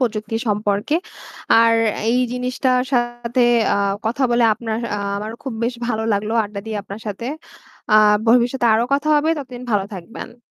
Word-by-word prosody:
প্রযুক্তি 225 -2 -2
সম্পর্কে। 210 +5 0 0.7
আর 230 0 +5 0.4
এই 245 - +2
জিনিসটার 250 0 0
সাথে, 240 0 0 0.3
আ - - +1 0.3
কথা 240 +5 -1
বলে 240 0 +3
আপনার, 225 0 -4 0.2
আ - - -2 0.2
আমারও 215 +3 -5
খুব 265 - -4
বেশ 240 - -1
ভালো 220 -2 -1
লাগলো 210 +2 -1
আড্ডা 205 0 -7
দিয়ে 220 -1 -3
আপনার 200 +2 -9
সাথে। 210 +3 -5 0.7
আ - - +8 0.3
ভবিষ্যতে 245 +1 +3
আরও 225 +2 +2
কথা 285 +2 -1
হবে, 305 +2 +2
ততদিন 250 -3 -8
ভালো 205 -3 +1
থাকবেন। 230 +6 -9
235 Hz, 160 wpm, -20 LUFS, 215-250 Hz, 0.7 s, আ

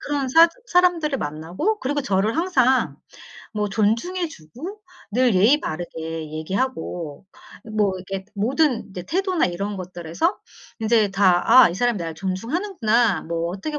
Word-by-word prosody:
그런 285 -2 -2
사 330 +5 +7 0.2
사람들을 355 - +2
만나고 165 - -2
그리고 290 +3 -1
저를 205 +2 0
항상 265 -8 +2 0.6
뭐 210 -1 -1
존중해 230 - 0
주고 310 - -10 0.3
늘 245 -2 +3
예의 230 +11 +5
바르게 160 -1 -5
얘기하고 175 - -4 0.5
뭐 205 -2 +2
이렇게 190 +1 -6
모든 255 +5 +1
이제 180 -2 -7
태도나 365 - 0
이런 195 +3 -4
것들에서 180 - -2 0.4
인제 220 -2 +3
다 190 -2 +3 0.2
'아 - - +5
이 - - -5
사람이 240 0 +1
나를 165 -2 -5
존중하는구나.' 230 - 0
뭐 170 +1 -2
어떻게 295 - -4
215 Hz, 305 characters per minute, -22 LUFS, 180-290 Hz, 0.6 s, 사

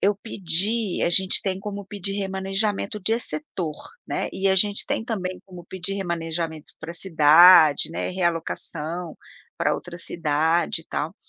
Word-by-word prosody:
eu 200 +1 +2
pedi 200 +1 +1
a 170 - +2
gente 190 +1 +4
tem 190 -1 -2
como 200 0 -6
pedir 195 0 -3
remanejamento 195 +2 -2
de 220 +5 0
setor, 185 - -4 0.3
né, - - -3
e 195 +1 0
a 190 - +3
gente 205 +2 +2
tem - - -2
também 185 -6 -4
como 180 -2 -12
pedir 190 +2 -4
remanejamento 165 -4 -4
para 160 +1 -7
cidade, 165 -2 +6
né, - - -3
realocação 170 -1 -3 0.4
para - - +1
outra 175 -1 -8
cidade 165 0 0
e - - -30
tal, 160 +5 -4
185 Hz, 150 wpm, -23 LUFS, 165-195 Hz, 0.4 s, cidade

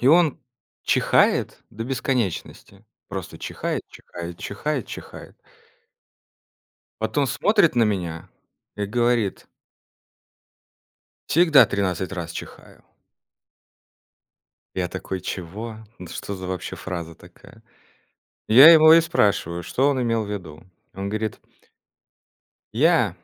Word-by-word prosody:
и 125 - 0
он 165 0 +4 0.4
чихает - - +2
до 115 +2 -6
бесконечности. 120 -5 -3 0.2
Просто 95 -4 -7
чихает, - - -4
чихает, 85 0 -9
чихает, 130 +5 -3
чихает. - - -10 1.7
Потом 135 +5 0
смотрит 200 - +2
на 115 - +5
меня 90 -6 -3 0.5
и 105 - -2
говорит 120 -1 0 1.8
"Всегда 160 -3 +6
13 95 -2 -2
раз 85 -2 -5
чихаю". - - -11 1.9
Я 90 -2 -1
такой: 95 0 -5
"Чего? 105 +6 -6 0.2
Да 90 - -9
что 100 - -5
за 95 -1 -7
вообще 90 -1 -5
фраза 85 -3 -6
такая?" - - -18 0.9
Я 135 +9 +9
его 160 -1 +8
и 165 - +7
спрашиваю, 100 - 0
что 130 +10 +1
он 130 -3 0
имел 115 -2 0
ввиду. 90 -7 -7 0.3
Он 100 +1 -5
горит 110 0 -3 1.3
"Я" - - +3
105 Hz, 105 wpm, -23 LUFS, 95-130 Hz, 1.9 s, Я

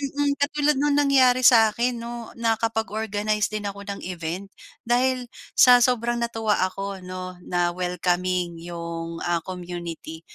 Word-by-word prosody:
mm, 285 +1 0
katulad 295 0 +2
nung 290 0 +2
nangyari 265 -3 +4
sa'kin 235 +1 +4
'no, 235 -1 -7
nakapag-organize 220 -2 0
din 215 -1 -3
ako 200 0 -8
ng 200 0 -5
event, 180 +2 -5 0.3
dahil 250 +1 +1 0.3
sa 250 -1 +8
sobrang 240 -1 +1
natuwa 225 -3 0
ako 195 +1 -5
'no, 185 0 -7
na 175 -1 +1
welcoming 180 -1 -1
yung 170 -1 -6
ah, 175 -1 +1
community. 175 -3 -7
210 Hz, 130 wpm, -24 LUFS, 180-240 Hz, 0.3 s, sa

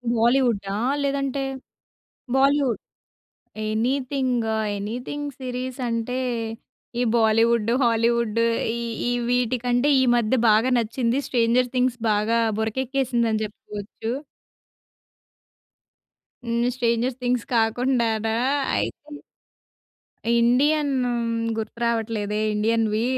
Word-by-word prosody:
బాలీవుడడా? 230 -4 +2 0.3
లేదంటే, 275 -1 -1 0.9
Bollywood. 275 -3 +3 0.9
Anything, 255 0 0 0.3
anything 250 +8 -4
series 255 0 -4
అంటే, 230 +2 -2 0.8
ఈ - - +3
బాలీవుడ్డు, 225 0 +3
హాలీవుడ్డు, 230 -1 +2 0.3
ఈ - - -4 0.3
ఈ - - +1 0.2
వీటికంటే 245 +1 +1
ఈ - - +4
మధ్య 235 +1 +1 0.2
బాగా 220 +4 +4
నచ్చింది. 235 +2 0
'స్ట్రేంజర్ 245 0 +2
థింగ్స్' 250 -1 +1
బాగా 215 +2 +2 0.2
బురకక్కేసింది 245 +1 0
అని 215 - 0
చెప్పుకోవచ్చు. 210 +2 -7 2.3
హ్మ్. 235 0 0
స్ట్రేంజర్స్ 240 0 0
థింగ్స్ 245 -1 0
కాకుండానా 225 -1 +1 0.4
అయితే 295 0 -4 1.2
ఇండియన్ 280 +5 +3 0.6
గుర్తు 220 +1 -5
రావట్లేదే 220 -2 -1
ఇండియన్‌వి. 220 0 +1
235 Hz, 85 wpm, -24 LUFS, 225-255 Hz, 2.3 s, ఈ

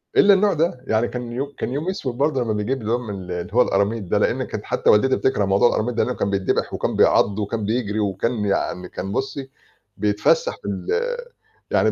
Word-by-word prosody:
إلّا 200 - +7
النوع 200 +1 +3
ده، 160 -5 0
يعني 110 +2 +2
كان 125 -1 -6
يو 140 +4 -4
كان - - -3
أيوم 145 +7 -2
أسود 130 -10 -3
برضه 140 -1 +1
لمّا 110 -2 -1
نيجيب 105 +6 -2
اللي 110 +1 -3
هو 120 - +3
من 110 -5 -6
ال 90 -2 -8
اللي 90 +2 -5
هو 125 - +5
القراميط 100 +1 +1
ده 90 - 0
لإن - - +1
كانت - - -6
حتّى - - 0
والدتي 130 +5 +5
بتكره 130 -6 +1
موضوع 100 +4 +4
القراميط 120 +2 -1
ده - - +2
لإنه 125 - -2
كان 100 - -1
بيتدّبح، 95 -1 0
وكان - - -2
بيعَض 100 +1 +3
وكان 105 +1 -2
بيجري 110 -1 -1
وكان 105 +2 -1
يعني 90 -2 -1
كان 95 +1 -5
بُصّي، 135 +3 -3 0.5
بيتفسّح 105 - +2
في - - -8
ال - - -4 0.8
يعني - - +3
115 Hz, 215 wpm, -22 LUFS, 100-130 Hz, 0.8 s, إلّا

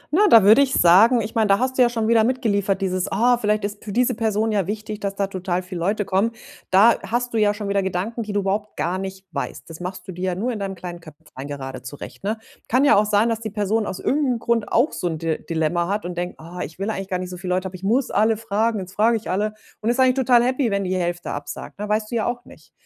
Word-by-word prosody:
Na, 415 +4 +5
da 225 -3 +8
würde 215 +7 +7
ich 270 -1 +1
sagen 215 +8 +6
ich 215 0 -5
meine, 220 -2 +2
da 195 0 +4
hast 260 +2 -2
du - - +7
ja 245 - +6
schon 225 -2 -1
wieder 225 -1 +4
mitgeliefert, 205 -5 0
dieses: 185 -1 -1
„Ah, 240 +5 +3
vielleicht 210 -2 0
ist 205 0 -6
für 210 - -6
diese 250 +4 +2
Person 220 -1 0
ja 200 -4 0
wichtig, 215 0 -5
dass 200 -1 -3
da 200 - 0
total 185 -2 -3
viel 180 -1 -7
Leute 205 +4 0
kommen.“ 200 +5 +1 0.4
Da 205 +5 +5
hast 245 +1 -2
du - - 0
ja 205 -1 +3
schon 205 -1 -5
wieder 200 0 +1
Gedanken, 190 +5 -3
die 215 -2 -5
du 205 0 0
überhaupt 200 +2 -2
gar 180 +3 -1
nicht 190 0 -7
weißt. - - -5
Das 165 -1 -10
machst 180 +1 -7
du 190 - -5
dir 180 +1 -4
ja - - -5
nur 235 +7 -1
in 225 - -4
deinem 195 -1 -4
kleinen 175 -1 -7
Köpflein 155 -4 -11
gerade 135 -3 -6
zurecht, 135 +8 -10
ne? 215 +3 -1 0.3
Kann 260 +4 +3
ja 290 - +6
auch 205 +1 +4
sein, 210 +2 +3
dass 225 -1 -1
die 225 -1 -5
Person 210 +1 -1
aus 185 - -5
irgend 295 +3 +1
'nem 250 -3 +1
Grund 230 -2 -1
auch 250 +7 +3
so 180 - -3
'n 160 -2 -2
Di 160 0 -3
Dilemma 165 +1 0
hat 205 +1 -2
und 175 0 -5
denkt: 175 +1 -4
„Ah, 170 +3 -10
ich 160 - -9
will 195 +3 -2
eigentlich 195 -3 -5
gar 185 - 0
nicht 180 0 -6
so 180 - -7
viel 180 +1 -6
Leute, 185 +1 0
aber 185 - -9
ich 185 - -11
muss 240 +6 +1
alle 220 +2 +2
fragen, 225 +1 0
jetzt 185 0 -8
frage 225 +3 +3
ich 220 - -6
alle.“ 210 +3 -1 0.3
Und 220 - 0
ist 240 +2 0
eigentlich 260 -1 +5
total 250 -2 +4
happy, 255 0 +1
wenn 200 -1 0
die 185 0 -1
Hälfte 175 -1 -2
absagt, 145 +6 -7
ne 210 0 -4
weißt 215 0 0
du - - -2
ja 220 - 0
auch 245 0 -4
nicht. - - -17
205 Hz, 280 wpm, -22 LUFS, 185-225 Hz, 0.4 s, da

